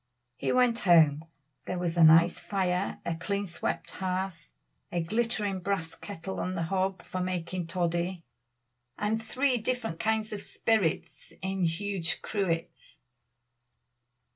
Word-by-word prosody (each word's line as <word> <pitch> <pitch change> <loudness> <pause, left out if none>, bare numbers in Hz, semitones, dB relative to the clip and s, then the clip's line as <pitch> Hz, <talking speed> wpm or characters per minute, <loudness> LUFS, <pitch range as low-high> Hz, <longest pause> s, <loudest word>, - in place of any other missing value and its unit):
He - - -1
went 250 -2 +3
home; 160 -4 +5 0.4
there 180 - -2
was 175 -1 -1
a 170 - +5
nice 165 +2 +7
fire, 190 -1 -1
a 170 - -1
clean 200 +4 -2
swept 170 -1 -3
hearth, 185 -2 -3 0.4
a 175 - 0
glittering 215 0 0
brass 180 -3 -2
kettle 190 -2 -6
on 185 +1 -2
the 170 - -1
hob 190 +1 -1
for 185 - -4
making 180 -1 -2
toddy, 175 0 -1 0.7
and 215 +2 0
three 255 +2 +1
different 225 -7 -2
kinds 220 +3 +1
of 205 - -4
spirits 215 -8 -1
in 190 -1 0
huge 175 0 -1
cruets. 180 -6 -3
185 Hz, 130 wpm, -29 LUFS, 170-205 Hz, 0.7 s, nice